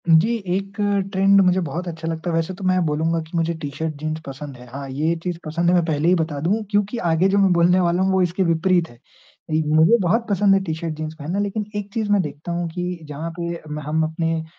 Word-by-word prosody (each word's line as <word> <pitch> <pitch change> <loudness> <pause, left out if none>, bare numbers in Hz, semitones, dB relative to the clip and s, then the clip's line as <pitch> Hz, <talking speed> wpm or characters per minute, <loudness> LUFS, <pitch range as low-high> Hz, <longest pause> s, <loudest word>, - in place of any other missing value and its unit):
जी, 170 +9 +5
एक 195 +2 -2 0.4
ट्रेंड 195 0 +5
मुझे 185 0 +3
बहुत 170 +3 -4
अच्छा 165 -1 -5
लगता 165 +1 -3
है। 165 - 0
वैसे 165 +3 -1
तो 190 +2 -10
मैं 185 0 +3
बोलूँगा 160 +2 0
कि 160 0 -13
मुझे 165 0 +1
टी-शर्ट 160 0 -4
जीन्स 155 +2 -4
पसंद 140 0 -7
है। 125 - -12
हाँ, 135 +3 -7
ये 155 +5 0
चीज़ 180 -2 -2
पसंद 170 +3 0
है - - +4
मैं 175 - +3
पहले 155 -1 0
ही 180 - +5
बता 155 -3 -3
दूँ 205 +8 +1
क्योंकि 205 +3 +1
आगे 165 +3 +3
जो 200 - +2
मैं 195 -2 +4
बोलने 175 +2 +4
वाला 175 0 +2
हूँ 190 - +2
वो 190 0 +3
इसके 180 +2 +1
विपरीत 170 0 +2
है। 120 - -16 0.5
मुझे 155 +6 +4
बहुत 220 +7 +1
पसंद 200 0 +4
है 195 - +2
टी-शर्ट 160 -2 -3
जीन्स 155 0 -4
पहनना, 165 +7 -2
लेकिन 205 +1 -2
एक 205 -1 -5
चीज़ 220 -2 -1
मैं 205 -1 +4
देखता 150 +1 -6
हूँ 170 0 -1
कि 180 +1 -4
जहाँ 150 +3 -4
पे 170 0 -3
मैं 150 0 -5
हम 155 +2 0
अपने 165 0 -1
170 Hz, 240 wpm, -22 LUFS, 160-185 Hz, 0.5 s, जी